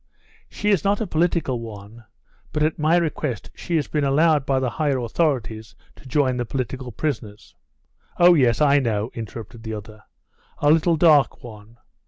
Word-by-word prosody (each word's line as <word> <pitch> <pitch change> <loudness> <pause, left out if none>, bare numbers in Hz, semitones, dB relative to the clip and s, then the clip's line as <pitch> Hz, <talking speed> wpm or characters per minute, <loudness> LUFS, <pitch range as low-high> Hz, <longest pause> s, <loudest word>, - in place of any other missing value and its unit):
"She 210 0 -1
is 195 -6 +2
not 200 +1 +1
a 220 - -1
political 165 - 0
one, 110 0 -10 0.5
but 150 - 0
at 155 +1 0
my 155 +3 +3
request 150 -7 -3
she 175 - -4
has 155 - 0
been 150 -2 -1
allowed 145 +1 +2
by 135 -1 +2
the 130 -2 -1
higher 145 -2 0
authorities 120 -4 -2 0.2
to - - -15
join 130 -1 +1
the 120 - -1
political 130 +1 -4
prisoners 110 -5 -5 0.3
" - - -37
"Oh, 175 0 +7
yes, 130 -5 +2
I 145 -1 +5
know," 110 -3 -1
interrupted 115 -1 -8
the 110 -1 -5
other; 110 +1 -10 0.6
"a 145 - +3
little 165 +1 +3
dark 150 -5 +4
one? 110 -1 -12
135 Hz, 175 wpm, -22 LUFS, 115-155 Hz, 0.6 s, Oh